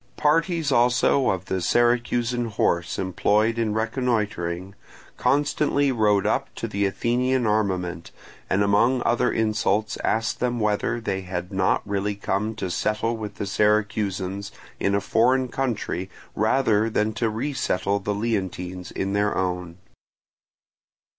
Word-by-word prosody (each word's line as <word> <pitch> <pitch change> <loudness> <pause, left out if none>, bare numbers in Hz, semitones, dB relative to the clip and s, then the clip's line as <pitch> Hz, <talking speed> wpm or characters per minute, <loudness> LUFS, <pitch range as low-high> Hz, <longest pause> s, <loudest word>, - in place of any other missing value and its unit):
Parties 160 0 +2
also 125 +2 +3
of 95 -1 -1
the 95 -1 -2
Syracusan 120 +3 +1
horse 85 -6 0
employed 105 +5 +1
in 110 -2 0
reconnoitring 105 -6 -1 0.4
constantly 145 +1 +1
rode 105 -5 +2
up - - 0
to - - -4
the 100 0 0
Athenian 125 +5 0
armament, 95 -5 -1 0.4
and 100 +2 +2
among 120 +5 +3
other 120 +1 +2
insults 110 -1 0
asked 110 0 0
them 120 -1 0
whether 105 +2 0
they 95 -4 -2
had 90 0 -5
not 95 +1 +1
really 100 0 -1
come 100 +2 -2
to 95 -4 -4
settle 105 +5 0
with 105 -2 -6
the - - -4
Syracusans 100 -2 0 0.3
in 100 0 +1
a 100 - +1
foreign 125 +5 +2
country 115 -8 -2 0.2
rather 110 -1 +2
than 110 0 0
to 115 0 0
resettle 110 -5 -1
the 100 +1 -2
Leontines 95 -4 -3
in 95 +1 -2
their 105 +1 +1
own. 90 -2 -2
105 Hz, 130 wpm, -24 LUFS, 100-120 Hz, 0.4 s, also